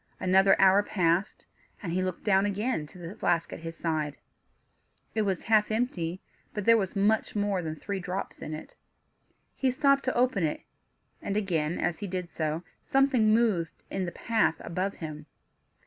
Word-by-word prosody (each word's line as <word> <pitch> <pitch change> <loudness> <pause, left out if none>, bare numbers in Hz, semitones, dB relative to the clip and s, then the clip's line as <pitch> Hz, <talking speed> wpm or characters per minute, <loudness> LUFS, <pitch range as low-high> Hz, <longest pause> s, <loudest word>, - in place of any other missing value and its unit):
Another 190 +1 +4
hour 195 +1 +6
passed, 180 -1 0 0.4
and 170 -4 -3
he 185 - +1
again 185 - 0
looked 185 - -5
down 205 -2 +1
to 180 - -15
the 175 +1 -7
flask 170 -5 0
at - - -7
his 165 0 -7
side; 155 -3 -2 1.0
it 220 - +1
was 195 -4 -1
half 215 -2 +3
empty; 190 -7 -2 0.3
but 210 -2 -3
there 230 - +7
was 195 -3 -1
much 210 +3 +2
more 205 -2 0
than 160 -2 -4
three 200 +5 -4
drops 185 +2 -5
in 155 - -4
it. 155 - -10 0.8
He 265 - +1
stopped 275 +2 +3
to 255 - 0
open 245 -6 +2
it, 155 - -1 0.6
and 200 - -2
again, 170 -6 0
as 175 -2 -1
he 205 - -4
did 180 -2 -4
so, 155 +1 -2 0.2
something 270 -5 +3
moved 215 -8 +1
in 190 -1 -1
the 175 - -4
path 220 -7 +1
above 185 +4 -2
him. 155 -2 -7
190 Hz, 175 wpm, -28 LUFS, 170-215 Hz, 1.0 s, there